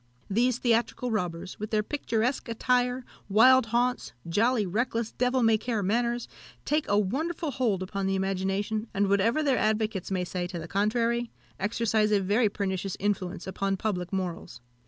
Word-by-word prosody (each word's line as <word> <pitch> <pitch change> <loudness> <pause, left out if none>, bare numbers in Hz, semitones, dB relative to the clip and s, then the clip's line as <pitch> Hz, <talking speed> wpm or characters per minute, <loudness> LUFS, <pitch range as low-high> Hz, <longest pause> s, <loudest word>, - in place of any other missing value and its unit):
These 240 +4 +2
theatrical 240 0 0
robbers, 180 -4 -3
with 215 0 -4
their 215 -1 +1
picturesque 245 -1 -1
attire, 250 +2 +1 0.2
wild 250 +4 +6
haunts, 245 +2 0
jolly, 220 +5 +2
reckless, 230 +4 -1
devil 250 0 +1
may 225 -1 +4
care 225 -2 -2
manners, 235 +4 0 0.4
take 300 0 0
a 205 - +2
wonderful 300 - -1
hold 225 -8 0
upon 195 +1 -3
the 195 - +1
imagination, 195 +3 -1
and 200 0 +2
whatever 225 +9 +2
their 275 -3 +2
advocates 215 -3 0
may 185 -2 -1
say 180 0 -3
to 180 -1 -6
the 165 0 -6
contrary, 230 +5 0 0.3
exercise 215 +1 +1
a 205 - +4
very 205 +4 +2
pernicious 195 -1 -3
influence 195 -3 -2
upon 195 +1 -1
public 185 -4 -2
morals. 180 -3 -4
215 Hz, 155 wpm, -28 LUFS, 195-240 Hz, 0.4 s, wild